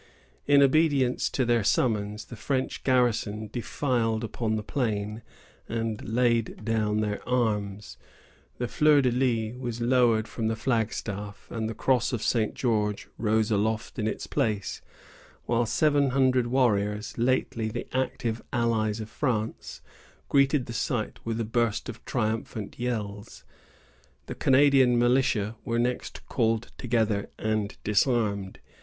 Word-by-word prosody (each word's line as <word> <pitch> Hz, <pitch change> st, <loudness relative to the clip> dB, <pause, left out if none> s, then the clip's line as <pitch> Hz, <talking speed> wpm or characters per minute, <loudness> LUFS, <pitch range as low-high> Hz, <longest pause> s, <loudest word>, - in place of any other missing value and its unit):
In 140 Hz, -1 st, +6 dB
obedience 140 Hz, -3 st, +3 dB
to 130 Hz, -, 0 dB
their 120 Hz, -2 st, +2 dB
summons, 105 Hz, -1 st, 0 dB
the 120 Hz, -, -10 dB
French 130 Hz, +3 st, -2 dB
garrison 110 Hz, -4 st, +1 dB
defiled 120 Hz, -2 st, -1 dB
upon 110 Hz, 0 st, -2 dB
the 105 Hz, -, -3 dB
plain, 105 Hz, -3 st, -2 dB, 0.5 s
and 115 Hz, -1 st, -2 dB
laid 115 Hz, -2 st, +1 dB
down 110 Hz, -1 st, +1 dB
their 105 Hz, -1 st, -2 dB
arms. 105 Hz, -5 st, -1 dB, 0.6 s
The 120 Hz, -, -2 dB
fleur 150 Hz, +1 st, +4 dB
de 125 Hz, -, +3 dB
lis 120 Hz, -1 st, 0 dB
was 120 Hz, -2 st, -4 dB
lowered 120 Hz, -2 st, +3 dB
from 115 Hz, -2 st, -3 dB
the 110 Hz, -, 0 dB
flagstaff, 110 Hz, -4 st, -3 dB
and 110 Hz, -1 st, -2 dB
the 115 Hz, -, -5 dB
cross 125 Hz, +1 st, +1 dB
of 115 Hz, -, -2 dB
St. 110 Hz, -3 st, +1 dB
George 105 Hz, -4 st, -1 dB
rose 110 Hz, 0 st, +1 dB
aloft 110 Hz, +3 st, -1 dB
in 110 Hz, -, 0 dB
its -, -, -3 dB
place, 110 Hz, -8 st, -1 dB, 0.6 s
while 120 Hz, 0 st, +1 dB
seven 145 Hz, +3 st, +3 dB
hundred 130 Hz, -1 st, +3 dB
Indian 120 Hz, -, -5 dB
warriors, 105 Hz, -5 st, +1 dB
lately 120 Hz, -2 st, +1 dB
the 110 Hz, -, -4 dB
active 120 Hz, -3 st, -1 dB
allies 115 Hz, -2 st, 0 dB
of 110 Hz, -, -6 dB
France, 110 Hz, -3 st, -3 dB, 0.5 s
greeted 140 Hz, -1 st, +3 dB
the 120 Hz, -, -7 dB
sight 115 Hz, -1 st, -2 dB
with 115 Hz, 0 st, -3 dB
a 115 Hz, -, -1 dB
burst 115 Hz, -1 st, 0 dB
of -, -, -8 dB
triumphant 110 Hz, -1 st, -3 dB
yells. 105 Hz, -4 st, -4 dB, 0.8 s
The -, -, -5 dB
Canadian 135 Hz, -2 st, +4 dB
militia 120 Hz, -3 st, +2 dB
were 115 Hz, -, -1 dB
next 125 Hz, +1 st, -2 dB
called 115 Hz, -2 st, 0 dB
together 110 Hz, -4 st, 0 dB
and 110 Hz, -2 st, -2 dB
disarmed. 105 Hz, -3 st, +1 dB
115 Hz, 135 wpm, -27 LUFS, 110-125 Hz, 0.8 s, In